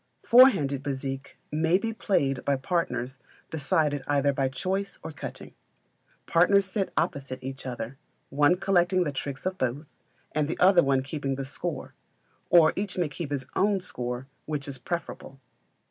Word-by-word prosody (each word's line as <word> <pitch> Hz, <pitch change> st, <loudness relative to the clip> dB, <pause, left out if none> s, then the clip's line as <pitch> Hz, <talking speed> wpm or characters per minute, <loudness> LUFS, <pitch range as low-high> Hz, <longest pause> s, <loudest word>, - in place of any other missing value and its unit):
Four 255 Hz, +3 st, +9 dB
handed 140 Hz, -, -2 dB
Bezique 135 Hz, 0 st, -5 dB
may 160 Hz, +3 st, +3 dB
be 225 Hz, +3 st, -3 dB
played 140 Hz, -, 0 dB
by 140 Hz, -, +2 dB
partners 135 Hz, -4 st, -2 dB, 0.3 s
decided 150 Hz, -1 st, +1 dB
either 140 Hz, -1 st, +2 dB
by 135 Hz, -1 st, 0 dB
choice 190 Hz, +10 st, -3 dB
or 160 Hz, -, -5 dB
cutting. 150 Hz, -, -8 dB, 0.7 s
Partners 190 Hz, +4 st, +4 dB
sit 195 Hz, 0 st, -2 dB
opposite 135 Hz, -2 st, -1 dB
each 135 Hz, 0 st, -6 dB
other, 120 Hz, +1 st, -5 dB, 0.3 s
one 145 Hz, +5 st, +4 dB
collecting 185 Hz, -1 st, +2 dB
the 150 Hz, -, -2 dB
tricks 140 Hz, +1 st, -5 dB
of 185 Hz, 0 st, -2 dB
both, 130 Hz, +5 st, -1 dB, 0.5 s
and 150 Hz, -1 st, 0 dB
the 160 Hz, -, -3 dB
other 180 Hz, -1 st, +6 dB, 0.2 s
keeping 140 Hz, -1 st, -3 dB
the 135 Hz, 0 st, -4 dB
score, 145 Hz, +2 st, -5 dB, 0.6 s
or 165 Hz, -2 st, +6 dB
each 200 Hz, -1 st, -3 dB
may 175 Hz, -4 st, +1 dB
keep 150 Hz, +1 st, -6 dB
his 140 Hz, -3 st, -2 dB
own 200 Hz, 0 st, +2 dB
score, 125 Hz, -7 st, -5 dB, 0.2 s
which 150 Hz, -2 st, -3 dB
is 135 Hz, -2 st, -6 dB
preferable. 135 Hz, -2 st, -5 dB
145 Hz, 155 wpm, -27 LUFS, 135-180 Hz, 0.7 s, Four